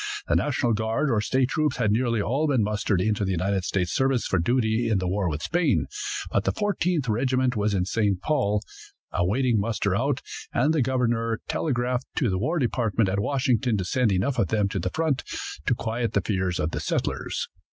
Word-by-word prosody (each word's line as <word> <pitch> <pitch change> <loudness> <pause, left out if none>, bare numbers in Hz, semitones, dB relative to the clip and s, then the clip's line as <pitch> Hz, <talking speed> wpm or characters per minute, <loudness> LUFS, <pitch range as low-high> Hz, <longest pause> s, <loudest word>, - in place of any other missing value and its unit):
The - - +2
national 130 -5 +1
guard 110 +6 0
or 110 -3 +2
state 130 +3 +1
troops 150 -3 0
had 105 - +2
nearly 115 -1 +1
all 140 +8 0
been 130 -6 +2
mustered 105 -2 0
into 105 +2 0
the 95 - -1
United 95 +1 0
States 90 -3 0
service 135 -2 +1
for 95 - +1
duty 115 +3 +1
in 110 - +2
the 95 -1 -1
war 95 0 0
with 75 0 -4
Spain, 155 - +1 0.5
but 100 - +1
the - - +1
Fourteenth 180 -8 0
Regiment 130 +3 +1
was 105 -1 +1
in 90 -2 +1
St. 100 -2 0
Paul, 105 -4 0 0.5
awaiting 115 +6 +1
muster 100 -2 0
out, 135 +4 0 0.3
and 145 +6 +2
the 155 - +2
governor 115 -3 0
telegraphed 125 -3 -1
to 125 -9 +1
the 95 - 0
war 155 - 0
department 115 - +1
at 100 +1 0
Washington 125 -1 +1
to 95 - -2
send 125 +3 +1
enough 105 +8 0
of 100 - +2
them 105 -1 +1
to 95 - -2
the 90 +2 -1
front 155 - 0 0.4
to 125 - +3
quiet 115 +1 -2
the 100 - +2
fears 95 -2 -1
of 75 +2 -1
the - - -3
settlers. - - -2
115 Hz, 200 wpm, -25 LUFS, 100-130 Hz, 0.5 s, to